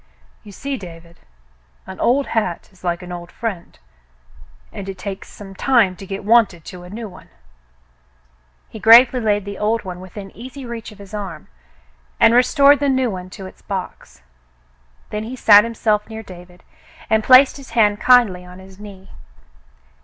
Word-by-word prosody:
"You 205 - -13
see, 275 +7 -5
David, 170 -4 -13 0.7
an 190 0 -10
old 270 +3 +2
hat 210 -7 -3
is 190 - -24
like 175 0 -2
an 180 - -9
old 175 -1 -8
friend, 205 -7 -6 1.0
and 195 -1 -7
it 190 - -7
takes 195 +1 -7
some 195 -2 -12
time 220 -3 +2
to 195 - -11
get 195 +1 -6
wonted 210 -7 +3
to 180 - -10
a 180 - -12
new 220 +3 -7
one." 185 - -15 1.4
He 220 - -11
gravely 240 +4 +7
laid 205 -3 0
the 200 -1 -7
old 215 +1 0
one 180 -1 -7
within 195 +1 -10
easy 255 +3 -10
reach 235 -2 -7
of 210 - -15
his 200 0 -14
arm 200 - -7 0.7
and 225 - +5
restored 280 +3 +5
the 285 -1 0
new 260 -3 +1
one 185 -1 -7
to 190 +1 -10
its 185 - -13
box. 190 - -7 0.9
Then 210 0 -3
he 240 +4 -7
sat 210 -4 +7
himself 220 -2 -1
near 220 0 -8
David 180 -2 -14 0.4
and 220 0 +1
placed 260 +3 +6
his 275 -1 -12
hand 210 -2 +3
kindly 235 -8 +4
on 180 0 -13
his 190 +1 -15
knee. 195 -2 -12
205 Hz, 170 wpm, -19 LUFS, 185-230 Hz, 1.4 s, gravely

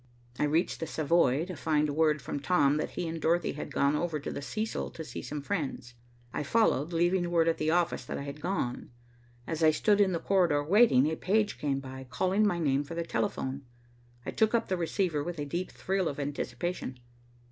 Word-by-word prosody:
I - - +3
reached 160 +4 +1
the 165 - -3
Savoy 155 -2 +2
to 185 -1 -6
find 150 -1 +1
word 155 -2 +2
from - - -3
Tom 145 -2 +3
that 155 - -2
he 175 - -1
and 165 0 -4
Dorothy 170 +2 +2
had 150 - -6
gone 140 +1 +2
over 160 -1 -1
to - - -5
the - - -5
Cecil 215 +9 -3
to 160 - -8
see - - -7
some 150 -1 -5
friends. 140 -9 -3 0.4
I - - -2
followed, 155 - +2
leaving 175 +1 +1
word 165 -1 +3
at 165 - +1
the 155 - +1
office 170 -3 +1
that - - -4
I - - -5
had 140 +1 -7
gone. 160 -10 -2 0.6
As 165 -1 -3
I 160 - +7
stood 205 +7 +3
in 195 -2 +4
the 170 - 0
corridor 170 -6 +2
waiting, 185 - +5
a 160 +1 0
page 210 +5 0
came 140 -2 0
by, 130 -1 -9
calling 190 - +2
my 175 - 0
name 145 -4 +1
for 145 +4 -8
the 170 - -1
telephone. 140 -8 -2 0.6
I - - -3
took 220 +1 +2
up 230 - 0
the 190 - +1
receiver 170 -3 0
with 175 +1 -5
a 145 - -3
deep 175 +6 -3
thrill 190 -2 -1
of 145 - -4
anticipation. 140 0 -3
160 Hz, 210 wpm, -30 LUFS, 145-180 Hz, 0.6 s, I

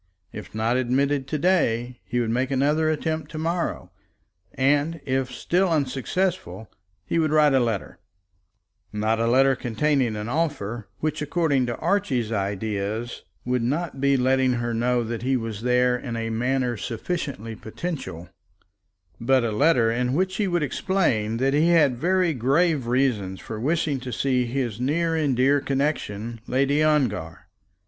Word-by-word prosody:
If - - -9
not 115 +3 +1
admitted 135 +2 +1
to 155 - -2
day 125 -8 +1
he 125 - -1
would 115 -2 0
make 125 +3 0
another 145 +4 +2
attempt 155 +1 -2
to - - -5
morrow, 170 +2 -2 0.6
and, 145 +4 +1
if 130 -1 -1
still 180 +8 +1
unsuccessful, 155 - -2 0.3
he 170 - 0
would 155 -1 +2
write 150 -1 +4
a 135 - +5
letter; 115 -5 -2 0.9
not 110 +2 0
a 115 - +1
letter 135 +3 +4
containing 125 0 0
an 105 +1 -4
offer, 120 -8 -2
which 155 -1 -1
according 145 -4 +1
to 120 - -3
Archie's 135 - 0
ideas 105 +2 -3 0.2
would 125 0 0
not 140 +3 -2
be 140 0 +3
letting 130 0 +2
her 120 -1 -2
know 120 +1 +1
that 115 0 -4
he 130 +1 +1
was 115 -3 -5
there 125 +1 +3
in 125 -1 -5
a 115 0 -3
manner 125 +1 0
sufficiently 115 - -4
potential, 110 - -6 0.9
but 130 +1 +3
a 115 - 0
letter 120 -1 +3
in 125 +2 0
which 185 +2 0
he 210 - +1
would 175 -3 0
explain 130 - 0
that 135 +3 +1
he 150 +3 +3
had 145 -8 +4
very 180 +1 +2
grave 140 +2 +1
reasons 115 -7 0
for 110 - -7
wishing 150 +1 0
to 125 0 -6
see 125 -1 0
his 120 -3 -3
near 165 +5 +1
and 145 -6 +1
dear 140 +3 +3
connexion, 120 -6 -2
Lady 140 +3 +2
Ongar. 120 - 0
130 Hz, 155 wpm, -24 LUFS, 115-150 Hz, 0.9 s, a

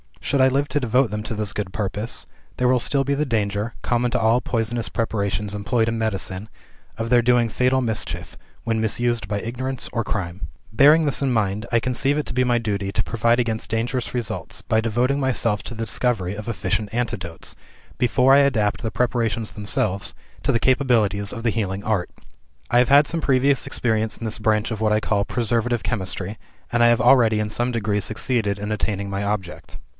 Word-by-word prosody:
Should 140 -1 0
I 130 - +6
live 140 +2 +1
to 145 - +1
devote 125 -1 +2
them 105 0 -3
to 110 - -4
this 105 -2 -2
good 100 -4 -4
purpose, 105 +2 -3 0.3
there 125 - +2
will 125 0 +3
still 135 +3 +2
be 140 +1 0
the 150 +2 0
danger 105 -2 -1
(common 120 0 0
to - - +1
all 115 +2 +3
poisonous 115 -1 -1
preparations 105 -2 -2
employed 110 +3 0
in 115 - -2
medicine) 100 -2 -2 0.5
of 115 0 -3
their 120 0 +5
doing 120 -1 +3
fatal 130 +3 +2
mischief, 110 -3 -3 0.3
when 115 -1 0
misused 115 -1 0
by 100 0 -2
ignorance 130 +3 -3
or 115 -2 -2
crime. 90 -6 -4 0.2
"Bearing 150 +8 +6
this 145 - +1
in 135 -2 +1
mind, 105 -1 0
I 115 -1 +3
conceive 130 +4 0
it 150 - -1
to - - -4
be 125 +1 +2
my 120 -1 +2
duty 100 -3 -2
to - - +1
provide 115 +1 +1
against 110 -2 -3
dangerous 115 +2 -2
results, 120 -3 -4
by 110 - +1
devoting 120 +5 +1
myself 115 -6 0
to - - -6
the 115 0 -3
discovery 105 -5 0
of 105 +1 -7
efficient 110 -2 -2
antidotes, 95 -8 -4 0.4
before 125 +2 +4
I 140 - +7
adapt 115 -7 +2
the 110 - -1
preparations 115 -1 -1
themselves 100 -1 -1 0.3
to - - +2
the 115 - +2
capacities 115 -6 +2
of 115 - -6
the 115 - +2
healing 100 -2 -2
art. 105 -5 0 0.6
I 120 - +5
have 125 - +3
had 145 +2 +7
some 165 +1 -2
previous 135 0 +2
experience 110 -2 0
in - - -9
this 110 0 -1
branch 110 +1 +1
of 110 - -3
what 110 -1 +2
I 110 - +2
call 100 -2 0
preservative 120 0 0
chemistry, 100 -2 -3 0.3
and 120 - +1
I 120 - +7
have 120 -1 +3
already 115 -3 +5
in 105 - -2
some 120 +3 -1
degree 105 -2 0
succeeded 110 -1 0
in 105 +1 -4
attaining 100 -2 -2
my 100 +1 -2
object. 100 -4 -4
115 Hz, 200 wpm, -22 LUFS, 105-125 Hz, 0.6 s, I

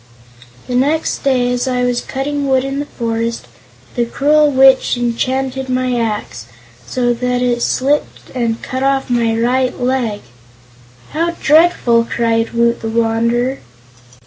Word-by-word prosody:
"The 250 - -5
next 290 +6 0
day, 250 -3 +1
as 245 +2 -1
I 250 -1 0
was 245 0 0
cutting 280 +1 -3
wood 260 -1 +2
in 275 +1 -3
the 290 - -4
forest, 230 -2 -3 0.5
the 240 - 0
cruel 295 +5 +2
Witch 265 -2 +4
enchanted 260 +2 -2
my 255 0 0
axe, 210 - -3 0.4
so 245 -1 0
that 250 +1 -1
it 240 -1 0
slipped 280 +5 -1
and 235 -3 -2
cut 260 0 -4
off 270 -1 0
my 230 -2 +1
right 250 +3 0
leg." 245 -4 -1 0.9
"How 335 +2 -1
dreadful!" 295 -7 +4
cried 230 -1 0
Woot 235 0 +1
the 225 - -3
Wanderer. 235 +3 0
250 Hz, 140 wpm, -16 LUFS, 235-270 Hz, 0.9 s, Witch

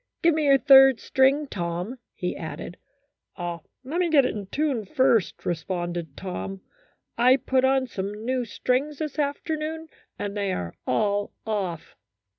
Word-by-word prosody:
Give 335 0 +5
me 310 -1 0
your 275 -1 +6
third 270 -2 +7
string, 270 +3 +3
Tom," 180 +2 -4 0.2
he 180 - -3
added. 160 +2 -7 0.3
" 285 - -44
Let 175 -2 -3 0.3
me 340 +6 0
get 285 -5 +5
in 205 -5 -3
tune 275 -1 -1
first," 225 0 +1
responded 175 -3 -3
Tom. 195 0 -5 0.3
" - - -38 0.3
I 250 +2 +6
put 260 0 +1
on 265 0 +3
some 210 -1 -5
new 255 0 0
strings 255 +6 -1
this 305 -1 -4
afternoon, 310 +2 -2 0.3
and 205 0 -4
they 200 -2 -1
are 85 -1 -4
all 205 +8 0
off." 195 -7 -3
240 Hz, 150 wpm, -25 LUFS, 190-275 Hz, 0.3 s, third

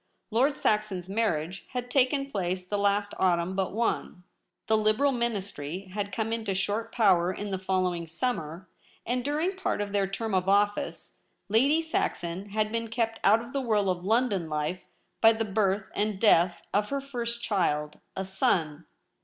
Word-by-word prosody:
Lord 265 +6 +2
Saxon's 210 -4 0
marriage 190 -4 -1
had 245 -1 -4
taken 275 +1 +2
place 185 -3 -2
the 205 +2 -2
last 205 0 +1
autumn 180 0 +2
but 190 -1 0
one. 210 -4 -2 0.4
The 220 - +3
Liberal 215 +6 +3
Ministry 200 - -3
had 205 0 -3
come 225 0 -1
into 220 -4 -2
short 215 +4 -1
power 185 -6 +4
in 205 +2 -5
the 190 - -2
following 185 -3 -1
sum 245 +10 -1
mer, 165 +4 -8 0.4
and 245 +1 -1
during 310 +7 0
part 375 - -1
of 205 -1 -2
their 200 -1 +1
term 215 +2 -3
of 185 0 +1
office 205 +1 0 0.3
Lady 275 +10 +4
Saxon 190 - -2
had 215 +1 0
been 230 0 -2
kept 225 0 -1
out 215 +3 +5
of 235 +3 -11
the 275 - 0
whirl 210 -6 +2
of 180 -1 -4
London 210 -5 +1
life 150 +4 -2 0.4
by 225 0 +7
the 225 0 -2
birth 195 -1 0
and 205 -1 -1
death 175 -5 +4
of 210 +1 +1
her 280 - -1
first 235 -4 -4
child 150 -7 0
— - - -46
a 190 - -3
son. 165 -5 0
205 Hz, 175 wpm, -28 LUFS, 185-230 Hz, 0.4 s, by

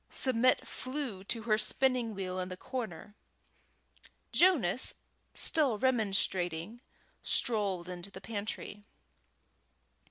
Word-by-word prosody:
Submit 255 -1 +3
flew 255 -8 -4
to 225 +2 -2
her 215 -1 +2
spinning 240 0 +1
wheel 185 -1 -3
in 185 0 -3
the 185 - -6
corner. 220 -5 -6 1.2
Jonas, 270 - +3 0.4
still 285 -9 +4
remonstrating, 200 -4 0 0.4
strolled 200 -7 +1
into 180 +1 -7
the 190 - -10
pantry. 205 0 -5
215 Hz, 95 wpm, -32 LUFS, 190-255 Hz, 1.2 s, still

